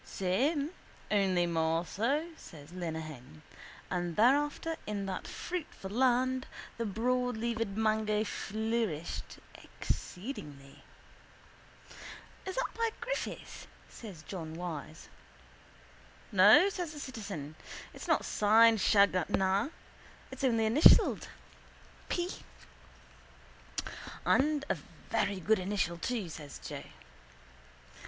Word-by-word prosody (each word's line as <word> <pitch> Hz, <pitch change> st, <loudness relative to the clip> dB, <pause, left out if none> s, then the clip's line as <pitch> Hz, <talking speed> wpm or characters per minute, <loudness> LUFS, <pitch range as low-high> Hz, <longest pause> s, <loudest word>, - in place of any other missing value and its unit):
—Same 280 Hz, -, 0 dB, 0.4 s
only 190 Hz, -4 st, +3 dB
more 165 Hz, 0 st, +1 dB
so, 275 Hz, -, 0 dB
says 155 Hz, -, -12 dB
Lenehan. 155 Hz, -, -6 dB, 0.5 s
And 175 Hz, -2 st, -1 dB
thereafter 290 Hz, +7 st, +3 dB
in 205 Hz, -2 st, -2 dB
that 190 Hz, -1 st, -4 dB
fruitful 320 Hz, -, -5 dB
land 255 Hz, +2 st, +2 dB, 0.3 s
the 230 Hz, -, 0 dB
broadleaved 230 Hz, -1 st, -1 dB
mango 215 Hz, -1 st, +2 dB
flourished 220 Hz, -6 st, -2 dB, 0.2 s
exceedingly. 150 Hz, -, -6 dB, 1.7 s
—Is 380 Hz, -, -3 dB
that -, -, +1 dB
by 460 Hz, 0 st, +1 dB
Griffith? -, -, -5 dB, 0.2 s
says 190 Hz, -9 st, -10 dB
John 160 Hz, -4 st, -6 dB
Wyse. 160 Hz, -3 st, -6 dB, 1.2 s
—No, 205 Hz, -, +8 dB
says 355 Hz, -5 st, -4 dB
the 295 Hz, -, -8 dB
citizen. 200 Hz, -, -6 dB, 0.4 s
It's -, -, -9 dB
not -, -, +2 dB
signed 220 Hz, +1 st, +5 dB
Shanganagh. 195 Hz, -, +3 dB, 0.6 s
It's -, -, -7 dB
only 230 Hz, -4 st, +3 dB
initialled: 265 Hz, +9 st, +6 dB, 0.8 s
P. 350 Hz, 0 st, 0 dB, 2.0 s
—And 295 Hz, +1 st, +3 dB
a -, -, +2 dB, 0.4 s
very 200 Hz, -2 st, +1 dB
good 215 Hz, +4 st, +3 dB
initial 185 Hz, -3 st, -1 dB
too, 225 Hz, 0 st, -2 dB
says 155 Hz, -3 st, -8 dB
Joe. -, -, -7 dB
210 Hz, 95 wpm, -32 LUFS, 175-250 Hz, 2.0 s, No